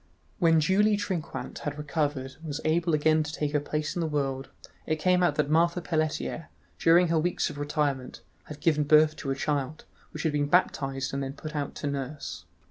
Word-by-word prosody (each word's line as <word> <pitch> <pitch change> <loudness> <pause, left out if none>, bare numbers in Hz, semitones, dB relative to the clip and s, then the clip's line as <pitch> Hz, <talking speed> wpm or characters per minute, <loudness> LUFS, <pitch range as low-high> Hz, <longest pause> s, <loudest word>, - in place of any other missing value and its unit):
When 165 -3 +5
Julie 205 +6 +3
Trinquant 185 -6 -4
had 145 0 -4
recovered 145 -3 -2
and 165 - -13
was 145 0 -3
able 165 +1 +2
again 155 +1 +3
to 150 -1 -4
take 150 -2 -2
her 150 - +2
place 150 +1 -3
in - - -2
the 165 - 0
world, 135 -3 -2 0.4
it 155 - +1
came 180 +3 +2
out 175 - +3
that 150 -2 +1
Marthe 170 +3 +2
Pelletier, 155 0 -2 0.3
during 170 +1 +5
her 165 -1 +3
weeks 175 +2 0
of 145 - -9
retirement, 145 -3 -2 0.2
had 150 -1 -10
given 150 -3 +3
birth 155 +1 +5
to 135 - -5
a 135 - 0
child, 145 +1 -2 0.2
which 150 - -6
had 160 - +1
been 145 -1 +1
baptized 135 -6 +1
and 140 - -1
then 135 0 -4
put 155 +2 -8
out 145 -1 -3
to 145 - -4
nurse. 140 +1 -5
150 Hz, 205 wpm, -28 LUFS, 145-165 Hz, 0.4 s, When